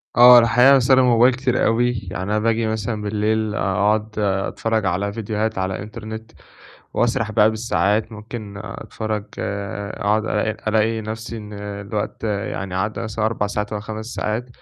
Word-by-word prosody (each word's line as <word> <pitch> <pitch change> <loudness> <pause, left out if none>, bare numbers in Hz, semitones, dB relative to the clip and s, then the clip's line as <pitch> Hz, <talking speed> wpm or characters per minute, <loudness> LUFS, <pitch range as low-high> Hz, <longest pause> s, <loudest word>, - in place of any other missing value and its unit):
آه 125 0 +10
الحقيقة 125 +4 +5
باستخدم 130 0 +5
الموبايل 125 0 +5
كتير 130 0 0
أوي، 120 +2 +2 0.2
يعني 95 - -4
أنا 105 +2 0
باجي 115 0 +1
مثلًا 110 0 -2
بالليل 105 +1 0
أقعد 105 +3 0
أتفرج 105 +2 0
على 100 +3 -1
فيديوهات 110 -1 -2
على 95 0 -2
إنترنت، 110 +1 -8 0.6
وأسرح 115 -2 +1
بقى 105 0 +5
بالساعات 110 0 0
ممكن 105 -1 -8
أتفرج 110 +1 -4
أقعد 100 +1 -2
ألاقي 110 0 0 0.2
ألاقي 110 +1 +2
نفسي 110 +2 -6
إن 105 -1 -9
الوقت 100 +1 -5
يعني 100 -2 -3
عدَّي 105 +3 -2
مثلًا 110 -1 -3
4 105 -2 -1
ساعات 105 +1 -3
أو 105 - -2
5 110 +1 -6
ساعات، 115 +1 -3
110 Hz, 150 wpm, -21 LUFS, 105-115 Hz, 0.6 s, آه